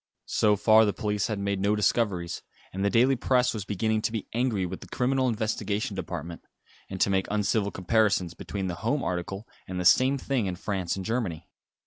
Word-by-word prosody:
So 105 -1 +2
far 110 +2 +5
the 105 -2 +1
police 105 -2 -1
had 110 - -2
made 100 -1 -1
no 100 +2 +2
discoveries, 100 -4 0 0.3
and 95 +1 -3
the 100 - +3
daily 125 +5 +4
Press 125 0 +2
was 105 -4 -5
beginning 110 +2 0
to 110 - -1
be 110 -3 -4
angry 115 -5 0
with 90 +1 -6
the - - -10
Criminal 130 +1 +1
Investigation 110 -2 -2
Department; 85 +2 -6 0.5
and 95 - -6
to 100 - +3
make 95 -1 +1
uncivil 105 0 +1
comparisons 95 -2 +1
between 95 +2 -5
the 90 - -2
home 135 +6 0
article 95 +4 -4 0.2
and 90 0 -4
the 90 - -2
same 130 +9 +5
thing 130 -5 -1
in 90 - -3
France 95 -2 -2
and 95 -1 -5
Germany. 110 -9 -2
105 Hz, 195 wpm, -27 LUFS, 95-115 Hz, 0.5 s, far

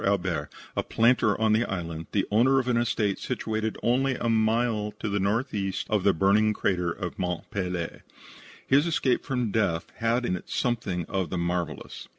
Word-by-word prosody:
Albert, 90 -7 0 0.3
a - - +1
planter 115 -2 +2
of 110 -1 +3
the 110 +2 +3
island, 85 -3 -4
the 100 - +1
owner 125 +6 +4
of 130 -2 +1
an 125 - +2
estate 110 -4 0
situated 110 -3 -2
only 130 +2 +2
a 120 - -2
mile 110 -1 +1
to - - -3
the 100 0 0
northeast 100 -2 -1
of 105 -3 +2
the 100 - +5
burning 100 +5 +3
crater 90 -4 0
of 95 +3 -5
Mont 90 -2 -2
Pelee. 90 -4 -3 0.6
His 140 +5 +4
escape 140 -6 +1
from 125 -5 -1
death 85 -6 0
had 115 +2 +1
in 90 - 0
it 90 - -9
something 100 - -1
of 95 -2 -2
the 90 - -3
marvellous. 85 0 -3
105 Hz, 175 wpm, -27 LUFS, 90-115 Hz, 0.6 s, the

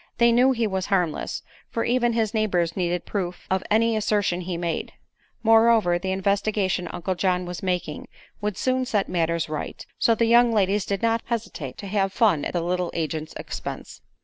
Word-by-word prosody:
They 235 0 +5
knew 250 +3 +5
he 235 -3 0
was 190 -2 -2
harmless, 180 -6 -1 0.3
for 230 - -1
even 240 -1 +2
his 225 -2 0
neighbors 180 -7 +1
needed 175 -2 -1
proof 180 -3 -4
of 190 0 +1
any 225 +1 +3
assertion 205 -4 +1
he 175 -1 -4
made; 170 -2 -3 0.5
moreover, 225 -5 +5
the 190 +1 -2
investigation 195 -1 0
Uncle 185 +2 -3
John 180 0 0
was 175 0 -6
making 180 -5 -2 0.3
would 210 -2 -2
soon 255 0 +1
set 205 -4 0
matters 170 -1 0
right; 155 0 -5
so 230 - +4
the 230 - +2
young 235 +1 +5
ladies 205 -2 +1
did 200 +1 -2
not 230 0 +2
hesitate 210 - -4
to - - -8
"have 195 -1 0
fun" 200 -9 +2
at - - -3
the 175 - 0
little 180 +1 -1
agent's 155 -1 -3
expense. - - -7
195 Hz, 180 wpm, -24 LUFS, 175-225 Hz, 0.5 s, They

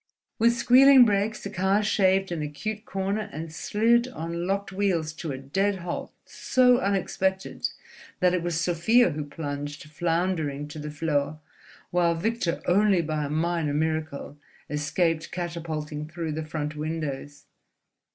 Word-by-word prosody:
With 235 +1 +5
squealing 260 +2 +7
brakes 210 0 0
the 200 - -5
car 195 +2 +2
shaved 195 -2 +2
an 170 -3 -2
acute 210 +9 -4
corner 195 +3 -2
and 160 +2 -6
slid 230 +7 +2
on 170 -7 -4
locked 195 +1 -1
wheels 185 -5 0
to 160 -1 -5
a 130 - -4
dead 195 +10 0
halt 175 -2 -5
so 250 -1 +3
unexpected 190 -3 -1 0.5
that 180 -2 +3
it 180 - +1
was 170 -1 -1
Sofia 180 +7 +3
who 150 0 -3
plunged 145 -1 -5
floundering 165 -3 -1
to 150 - -8
the 150 0 -5
floor, 150 -1 -1 0.5
while 175 -1 +2
Victor 185 -1 -1
only 195 -1 +3
by 155 -1 -2
a - - -4
minor 160 -1 0
miracle 155 -2 -2 0.3
escaped 160 +2 0
catapulting 160 -4 -4
through 165 0 -4
the 155 +1 -4
front 150 -1 -4
windows. 150 -2 -4
170 Hz, 140 wpm, -26 LUFS, 155-195 Hz, 0.5 s, squealing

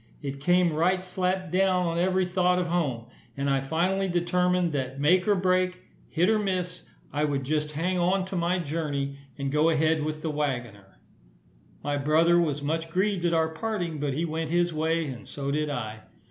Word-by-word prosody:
It 140 -1 -4
came 175 +1 +3
right 180 +4 +2
slap 185 -1 -2
down 185 -1 +2
on 170 0 -1
every 185 +1 +2
thought 180 0 +2
of 180 - +1
home; 140 -10 -1 0.3
and 140 0 -1
I 135 -1 +2
finally 180 +7 0
determined 180 0 +1
that 135 -1 -3
make 180 +7 +3
or 205 - +4
break, 185 0 +1 0.3
hit 170 +2 +2
or 220 0 +3
miss, 180 -3 -2 0.3
I 145 +1 0
would 140 -2 0
just 150 +2 -1
hang 180 +4 -1
on 185 +2 +2
to 190 - -6
my 175 +1 +1
journey, 145 -4 -3 0.2
and 140 -1 -2
go 150 +3 +3
ahead 160 0 +2
with 155 0 -4
the 160 - -1
waggoner. 120 -10 -4 0.9
My 145 0 -1
brother 160 +4 +4
was 150 -4 0
much 160 +2 -2
grieved 185 +1 0
at 170 - +2
our 160 0 +2
parting, 175 -3 -3
but 140 -2 -1
he 165 +3 0
went 160 -1 -3
his 175 0 +1
way, 160 +1 0
and 130 -5 -7
so 140 -1 -4
did 150 +1 0
I. 110 -6 -4
165 Hz, 190 wpm, -27 LUFS, 145-180 Hz, 0.9 s, or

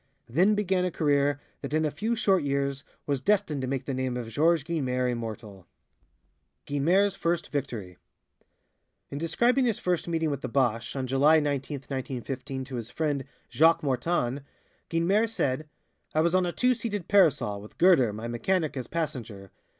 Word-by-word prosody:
Then 180 - +3
began 190 -3 +1
a 180 - +1
career 145 -3 +1 0.2
that 140 +2 -3
in 155 0 +2
a 150 - 0
few 220 +10 -1
short 195 -5 +3
years 140 -1 -1 0.2
was 140 -3 -1
destined 190 -4 +1
to 130 - -2
make 135 0 -2
the 140 - -3
name 130 -1 -2
of 120 -2 -5
Georges 160 +6 +2
Guynemer 130 -6 -1
immortal. 110 -5 -7 1.0
Guynemer's 180 +8 +2
First 170 0 -1
Victory 115 -11 -4 1.1
In 140 - -4
describing 240 - +2
his 230 -4 +1
first 180 -2 -1
meeting 165 -2 0
with 140 -1 -3
the - - -3
Boche 130 -2 +2
(bosh) 115 +3 -8
on 135 -1 -2
July 140 +5 +4
19, 145 -1 -2
1915, 135 0 -5
to 130 -1 -6
his 115 0 -5
friend, 145 -4 -1 0.3
Jacques 165 +1 +4
Mortane, 135 -1 0 0.5
Guynemer 195 +7 +2
said: 155 - -1 0.5
"I 155 - +4
was 170 +2 +2
on 185 -1 +3
a - - -1
two 250 +7 +2
seated 205 -6 -4
'Parasol' 150 - +3
with 105 - -14
Guerder, 165 - +5
my 110 +3 -6
mechanic, 155 +7 -1
as 125 -3 -4
passenger. 115 - -4
145 Hz, 170 wpm, -27 LUFS, 130-170 Hz, 1.1 s, Guerder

